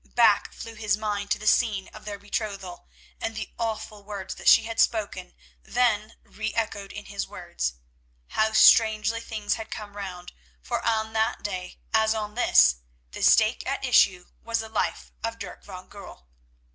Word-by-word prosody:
Back 225 Hz, -4 st, +4 dB
flew 230 Hz, -, -8 dB
his 215 Hz, -1 st, 0 dB
mind 205 Hz, -1 st, -3 dB
to -, -, +2 dB
the 215 Hz, -, -10 dB
scene 210 Hz, -4 st, +2 dB
of -, -, -13 dB
their 205 Hz, -1 st, -5 dB
betrothal, 200 Hz, -, -5 dB, 0.3 s
and 225 Hz, -, -3 dB
the 220 Hz, -, -5 dB
awful 215 Hz, -2 st, -4 dB
words 200 Hz, -2 st, -6 dB
that -, -, -8 dB
she -, -, +7 dB
had 225 Hz, 0 st, -5 dB
spoken 205 Hz, -5 st, 0 dB, 0.3 s
then 220 Hz, -, 0 dB
re 215 Hz, +1 st, -5 dB
echoed 205 Hz, -3 st, -2 dB
in -, -, -8 dB
his -, -, -4 dB
ears. 60 Hz, 0 st, -3 dB, 0.6 s
How 220 Hz, 0 st, +1 dB
strangely 220 Hz, 0 st, +5 dB
things 215 Hz, -3 st, -2 dB
had 225 Hz, -, -6 dB
come 205 Hz, -1 st, -7 dB
round, 185 Hz, -3 st, -7 dB, 0.3 s
for -, -, -3 dB
on 220 Hz, -1 st, 0 dB
that 220 Hz, 0 st, 0 dB
day, 185 Hz, -3 st, -5 dB, 0.2 s
as 220 Hz, 0 st, +3 dB
on 210 Hz, -1 st, -4 dB
this, 215 Hz, -, +5 dB, 0.3 s
the -, -, -8 dB
stake -, -, +5 dB
at -, -, -2 dB
issue 180 Hz, -1 st, +4 dB, 0.2 s
was 230 Hz, 0 st, -1 dB
the 220 Hz, -, -8 dB
life 220 Hz, -, -2 dB
of 230 Hz, 0 st, -3 dB
Dirk 200 Hz, -5 st, -9 dB
van 185 Hz, -2 st, -10 dB
Goorl. 195 Hz, -, -12 dB
215 Hz, 170 wpm, -26 LUFS, 200-225 Hz, 0.6 s, she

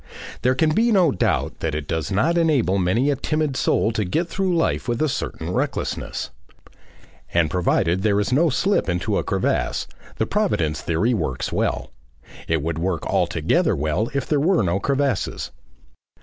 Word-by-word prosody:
There 130 Hz, +1 st, +2 dB
can 155 Hz, +4 st, +2 dB
be 230 Hz, +6 st, +3 dB
no 185 Hz, -7 st, +4 dB
doubt 90 Hz, -, -1 dB
that 80 Hz, -2 st, -2 dB
it 75 Hz, -2 st, -4 dB
does 80 Hz, -1 st, -2 dB
enable 140 Hz, -, +2 dB
many 115 Hz, +11 st, +2 dB
a -, -, +1 dB
timid 155 Hz, 0 st, -1 dB
soul 110 Hz, -, +1 dB
to 110 Hz, -1 st, -1 dB
get 160 Hz, -, -1 dB
through 185 Hz, 0 st, 0 dB
life 165 Hz, -, 0 dB
with 120 Hz, -1 st, -1 dB
a 155 Hz, -, +2 dB
certain 135 Hz, -, -4 dB
recklessness. -, -, -3 dB, 1.0 s
And 85 Hz, -3 st, +3 dB
provided 90 Hz, 0 st, +1 dB
there 105 Hz, 0 st, +2 dB
is 105 Hz, +5 st, 0 dB
no 160 Hz, +5 st, +4 dB
slip 190 Hz, -, +1 dB
into 90 Hz, 0 st, 0 dB
a -, -, -2 dB
crevasse, -, -, -1 dB, 0.3 s
the -, -, +1 dB
Providence 75 Hz, -2 st, 0 dB
theory 95 Hz, +9 st, +1 dB
works 80 Hz, -, -2 dB
well. 65 Hz, +1 st, -1 dB, 0.6 s
It 80 Hz, -3 st, 0 dB
would 80 Hz, 0 st, -2 dB
work 85 Hz, -1 st, -2 dB
altogether -, -, +1 dB
well 80 Hz, +10 st, -1 dB
if 140 Hz, -, 0 dB
there 150 Hz, -, +1 dB
were 170 Hz, -, +3 dB
no 90 Hz, +1 st, 0 dB
crevasses. 140 Hz, -2 st, -1 dB
110 Hz, 165 wpm, -22 LUFS, -, 1.0 s, no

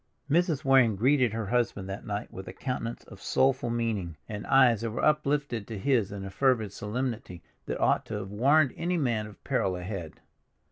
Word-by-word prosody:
Mrs. 160 Hz, -1 st, +1 dB
Waring 130 Hz, -5 st, +5 dB
greeted 125 Hz, +3 st, +3 dB
her 110 Hz, 0 st, -3 dB
husband 110 Hz, -3 st, 0 dB
that 95 Hz, +1 st, -6 dB
night 105 Hz, 0 st, -4 dB
with 95 Hz, -, -8 dB
a -, -, -7 dB
countenance 120 Hz, -3 st, -4 dB
of -, -, -14 dB
soulful 130 Hz, -2 st, +2 dB
meaning, 110 Hz, -8 st, -2 dB
and 105 Hz, -2 st, -6 dB
eyes 125 Hz, -5 st, +5 dB
that 115 Hz, -, -2 dB
were 110 Hz, -, -1 dB
uplifted 145 Hz, -7 st, +1 dB
to 110 Hz, -, -5 dB
his 115 Hz, -2 st, +1 dB
in 100 Hz, -1 st, -6 dB
a 95 Hz, -, -6 dB
fervid 110 Hz, -3 st, +1 dB
solemnity 110 Hz, -5 st, -4 dB, 0.2 s
that -, -, -3 dB
ought -, -, +2 dB
to -, -, -4 dB
have 100 Hz, -1 st, -5 dB
warned 135 Hz, +6 st, +3 dB
any 175 Hz, +1 st, -1 dB
man 120 Hz, -8 st, 0 dB
of 105 Hz, -, -15 dB
peril 110 Hz, -9 st, 0 dB
ahead. 90 Hz, -3 st, -6 dB
115 Hz, 190 wpm, -28 LUFS, 100-135 Hz, 0.2 s, Waring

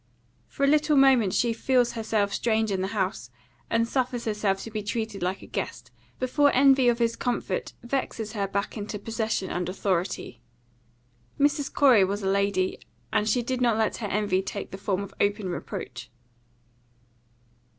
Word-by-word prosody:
For 280 Hz, -, -4 dB
a -, -, +5 dB
little 300 Hz, 0 st, +3 dB
moment 260 Hz, -7 st, +5 dB
she 235 Hz, +3 st, +1 dB
feels 245 Hz, +1 st, +2 dB
herself 215 Hz, -3 st, -1 dB
strange 220 Hz, -2 st, +1 dB
in 190 Hz, -1 st, 0 dB
the 190 Hz, -, -1 dB
house, 190 Hz, -, -2 dB, 0.4 s
and 230 Hz, 0 st, +2 dB
suffers 250 Hz, -1 st, -1 dB
herself 210 Hz, -3 st, 0 dB
to 225 Hz, -, -8 dB
be 215 Hz, -1 st, -3 dB
treated 220 Hz, 0 st, -3 dB
like 180 Hz, +2 st, -2 dB
a -, -, -9 dB
guest, -, -, -5 dB, 0.3 s
before 285 Hz, +3 st, +3 dB
envy 265 Hz, -1 st, +6 dB
of 235 Hz, -, +2 dB
his 230 Hz, -1 st, +1 dB
comfort 235 Hz, -6 st, -2 dB
vexes 240 Hz, -4 st, -3 dB
her 200 Hz, -3 st, -1 dB
back 200 Hz, +1 st, -3 dB
into 210 Hz, 0 st, -5 dB
possession 220 Hz, -2 st, -2 dB
and 180 Hz, 0 st, -2 dB
authority. 185 Hz, -, -2 dB, 1.0 s
Mrs. 290 Hz, 0 st, +2 dB
Corey 255 Hz, -8 st, +5 dB
was 200 Hz, +2 st, -1 dB
a -, -, 0 dB
lady, 200 Hz, -1 st, +1 dB, 0.3 s
and 215 Hz, 0 st, +2 dB
she 240 Hz, +3 st, +2 dB
did 255 Hz, +1 st, -2 dB
not 235 Hz, -3 st, +3 dB
let 220 Hz, -1 st, 0 dB
her 215 Hz, -, -4 dB
envy 200 Hz, -2 st, +1 dB
take 195 Hz, +1 st, -6 dB
the 195 Hz, -, -7 dB
form 195 Hz, -1 st, -1 dB
of 200 Hz, -, -8 dB
open 205 Hz, -1 st, +1 dB
reproach. 130 Hz, -7 st, -6 dB
220 Hz, 170 wpm, -26 LUFS, 195-245 Hz, 1.0 s, envy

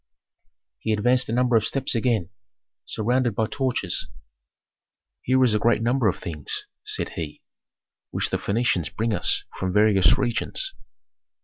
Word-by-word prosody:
He 110 Hz, -, -1 dB
advanced 125 Hz, +4 st, +2 dB
a -, -, -1 dB
number 125 Hz, 0 st, +2 dB
of 110 Hz, -, +4 dB
steps 135 Hz, -1 st, 0 dB
again, 115 Hz, -6 st, 0 dB, 0.5 s
surrounded 120 Hz, +1 st, 0 dB
by 110 Hz, -, +1 dB
torches. 125 Hz, -7 st, -2 dB, 1.1 s
"Here 130 Hz, +1 st, +3 dB
is 120 Hz, -4 st, +3 dB
a 105 Hz, -, +2 dB
great 115 Hz, 0 st, +2 dB
number 120 Hz, 0 st, +2 dB
of 95 Hz, -, +1 dB
things," 75 Hz, -4 st, -4 dB, 0.2 s
said -, -, -3 dB
he, 75 Hz, -3 st, -7 dB, 0.7 s
"which -, -, -2 dB
the -, -, +1 dB
Phœnicians 100 Hz, -6 st, 0 dB
bring 115 Hz, 0 st, 0 dB
us -, -, +1 dB, 0.2 s
from 95 Hz, -1 st, -1 dB
various 105 Hz, -2 st, +5 dB
regions. -, -, -1 dB
115 Hz, 140 wpm, -24 LUFS, 100-125 Hz, 1.1 s, various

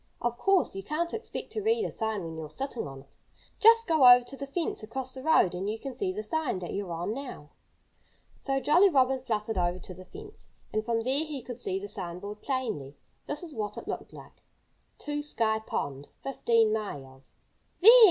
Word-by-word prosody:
Of 240 Hz, 0 st, -1 dB
course, 390 Hz, -2 st, +3 dB
you 195 Hz, -, -5 dB
can't 315 Hz, -, -2 dB
expect 445 Hz, +1 st, -5 dB
to 430 Hz, -, -3 dB
read 445 Hz, +1 st, +2 dB
a -, -, -3 dB
sign 220 Hz, -4 st, -2 dB
when 165 Hz, -1 st, -6 dB
you're 160 Hz, -1 st, -6 dB
sitting 265 Hz, -, -4 dB
on 135 Hz, -1 st, -9 dB
it. 140 Hz, -, -23 dB, 0.4 s
Just 460 Hz, +1 st, +7 dB
go 310 Hz, -7 st, +7 dB
over 245 Hz, 0 st, +7 dB
to 270 Hz, -, -7 dB
the 275 Hz, 0 st, -6 dB
fence 320 Hz, 0 st, -2 dB
across 255 Hz, +4 st, -5 dB
the 260 Hz, -, -7 dB
road 265 Hz, -, +4 dB
and 190 Hz, +3 st, -2 dB
you 220 Hz, -, -2 dB
can 270 Hz, +3 st, -6 dB
see 380 Hz, +4 st, -1 dB
the 420 Hz, +3 st, -4 dB
sign 315 Hz, -, -1 dB
that 180 Hz, -2 st, -5 dB
you're 195 Hz, -3 st, -3 dB
on 170 Hz, +5 st, -2 dB
now." 250 Hz, -, -8 dB, 0.9 s
So 270 Hz, -1 st, 0 dB
Jolly 350 Hz, +8 st, +5 dB
Robin 265 Hz, -4 st, +3 dB
fluttered 220 Hz, -4 st, -1 dB
over 175 Hz, 0 st, +1 dB
to 185 Hz, -, -9 dB
the 185 Hz, +1 st, -12 dB
fence. 420 Hz, -, -12 dB, 0.3 s
And 215 Hz, -, 0 dB
from 230 Hz, 0 st, 0 dB
there 265 Hz, +6 st, +1 dB
he 295 Hz, -5 st, -6 dB
could 245 Hz, -1 st, -8 dB
see 190 Hz, -, -1 dB
the 200 Hz, -, -6 dB
sign 185 Hz, -5 st, -5 dB
board 205 Hz, +3 st, -8 dB
plainly. 220 Hz, -, -3 dB, 0.3 s
This 290 Hz, +4 st, -3 dB
is 330 Hz, -3 st, -8 dB
what 210 Hz, -4 st, -4 dB
it -, -, -7 dB
looked -, -, -5 dB
like: -, -, -14 dB, 0.6 s
TO 295 Hz, 0 st, -3 dB
SKY 225 Hz, -7 st, +1 dB
POND, 140 Hz, 0 st, -3 dB, 0.2 s
15 230 Hz, -5 st, +2 dB
MILES 135 Hz, -11 st, -6 dB, 0.5 s
"There!" 425 Hz, +5 st, +10 dB
240 Hz, 210 wpm, -29 LUFS, 195-295 Hz, 0.9 s, There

